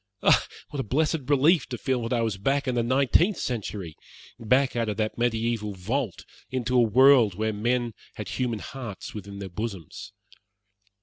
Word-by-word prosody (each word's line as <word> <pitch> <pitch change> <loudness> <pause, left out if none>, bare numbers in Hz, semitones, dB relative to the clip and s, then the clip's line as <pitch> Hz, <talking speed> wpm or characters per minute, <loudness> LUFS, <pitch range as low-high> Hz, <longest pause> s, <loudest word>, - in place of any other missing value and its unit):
Oh, - - +5 0.3
what 145 - -5
a - - 0
blessed 150 +3 0
relief 150 +4 +4
to - - -5
feel 130 -3 -1
that 115 - -4
I 120 -2 +1
was 110 -4 -2
back 135 +6 0
in 130 - +1
the 120 - +1
nineteenth 135 - +3
century 100 -8 -4 0.4
back 130 +4 +2
out 115 -2 0
of 105 - -3
that 110 -1 -1
mediaeval 115 -3 -1
vault 110 +3 -3 0.2
into 125 -1 -2
a 125 - +6
world 120 -2 +5
where 110 +2 -1
men 120 +2 0 0.2
had - - -6
human 120 -3 -1
hearts 115 -3 -7
within 100 -1 -8
their 100 -1 -6
bosoms. 95 -4 -6
120 Hz, 175 wpm, -26 LUFS, 105-130 Hz, 0.4 s, a